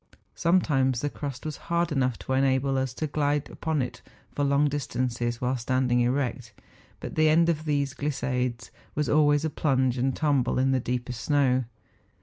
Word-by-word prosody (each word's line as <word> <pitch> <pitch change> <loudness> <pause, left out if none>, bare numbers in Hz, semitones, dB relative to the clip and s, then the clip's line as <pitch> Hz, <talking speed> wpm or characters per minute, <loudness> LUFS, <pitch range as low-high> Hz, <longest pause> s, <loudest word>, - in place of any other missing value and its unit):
Sometimes 135 -8 +2
the 145 - -2
crust 140 -2 -6
was 155 -2 -4
hard 170 0 +1
enough 130 -4 0
to 130 - -4
enable 135 0 +2
us 130 -1 0
to 155 - -2
glide 145 -1 -1
upon 160 -4 -1
it 125 0 -7 0.3
for 145 - -2
long 140 +1 +3
dis¬ 145 0 -3
tances 120 -2 -1
while 125 +2 -1
standing 125 0 +1
erect; 125 -2 -1 0.5
but - - -7
the 155 0 +3
end 165 +2 +4
of 155 -2 -1
these 145 -2 0
glissades 125 -4 -2 0.2
was 150 -1 0
always 145 0 +3
a - - 0
plunge 130 -5 +1
and 130 +1 0
tumble 140 -5 +1
in 135 +1 +2
the 130 - +2
deeper 125 0 -3
snow. 130 +1 +1
135 Hz, 175 wpm, -26 LUFS, 125-145 Hz, 0.5 s, end